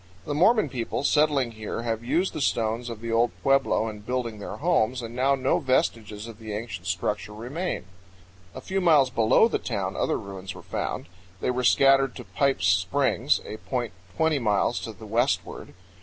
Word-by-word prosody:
The - - -2
Mormon 215 +9 +4
people 120 +1 -3
settling 145 -5 +2
here 110 +1 -5
have 115 -1 -2
used 170 +10 0
the - - -4
stones 115 -1 0
of 115 -2 -7
the 115 0 -4
old 115 +1 +3
pueblo 135 -4 +2
in 105 -1 -6
building 115 0 -3
their - - -6
homes, 130 -7 +1
and 115 +1 -7
now 135 +2 +3
no 130 0 +1
vestiges 110 -5 0
of 115 -3 -11
the 110 -2 -6
ancient 100 -4 -5
structure 105 +3 -2
remain. 135 - -4 0.7
A - - -7
few 190 0 -2
miles 150 -7 +5
below 110 -2 +4
the - - -1
town - - -3
other - - 0
ruins 95 -1 -7
were - - -11
found. - - -3 0.3
They - - 0
were 125 0 -2
scattered 135 +1 +4
to - - -8
Pipe's 135 -9 0
Springs, 110 +9 +2
a 110 - -6
point 120 -2 -3 0.2
twenty 160 -2 +2
miles 105 0 +1
to 115 - -6
the 110 +1 -12
westward. 120 +6 -1
120 Hz, 185 wpm, -26 LUFS, 110-135 Hz, 0.7 s, miles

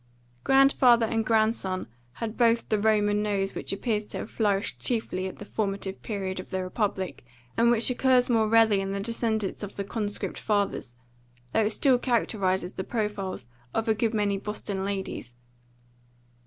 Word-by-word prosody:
Grandfather 265 -3 +5
and 225 0 0
grandson 220 -4 +1 0.3
had 225 - -5
both 230 -1 +3
the 215 - +2
Roman 210 -1 +2
nose 200 -2 -1
which - - -4
appears 210 +1 -1
to - - -7
have - - -6
flourished 205 -2 0
chiefly 205 -6 -1
at 190 - -8
the 205 - -9
formative 195 -2 -3
period 190 -3 -3
of 185 - -8
the 190 -1 -2
republic, 190 - -2 0.3
and 235 +1 +4
which 235 -1 +3
occurs 250 0 +3
more 225 -3 +3
rarely 220 -3 +5
in 195 0 -3
the 200 - -2
descendants 220 -1 -1
of 205 -1 -6
the 200 - -3
conscript 205 0 -3
fathers, 200 - -1 0.6
though 220 - +3
it - - +2
still 250 +3 +3
characterises 195 -7 0
the 190 - -4
profiles 210 - -3 0.3
of 225 - 0
a 220 - +4
good 225 +1 0
many 200 -2 +1
Boston 205 -2 -3
ladies. 190 -11 -4
210 Hz, 165 wpm, -27 LUFS, 195-225 Hz, 0.6 s, Grandfather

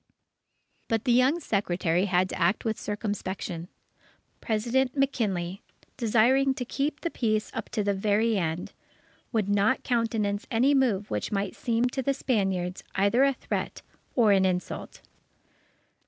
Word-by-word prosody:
But 225 -1 0
the 250 - +3
young 255 +7 +4
Secretary 180 - 0
had 185 -1 +2
to - - -5
act 175 +7 +2
with 220 -1 -1
circumspection. 195 -5 -4 0.7
President 250 +4 0
McKinley, 200 -9 -1 0.3
desiring 255 +3 +3
to 250 - -4
keep 285 +4 -2
the 335 - -2
peace 215 -3 -1
up 225 - -5
to 215 - -1
the 200 0 +1
very 210 +3 +1
end, 170 -2 -2 0.6
would 220 -4 0
not 205 +5 +2
countenance 225 -4 0
any 255 +5 +3
move 230 -7 +1
which 105 - -2
might 200 -1 -2
seem 230 0 0
to 265 - -3
the 275 +2 0
Spaniards 190 -8 -1
either 200 +7 +3
a 275 0 +4
threat - - -4 0.3
or 225 -5 +5
an 195 -1 +4
insult. 185 -1 -2
215 Hz, 140 wpm, -27 LUFS, 195-250 Hz, 0.7 s, or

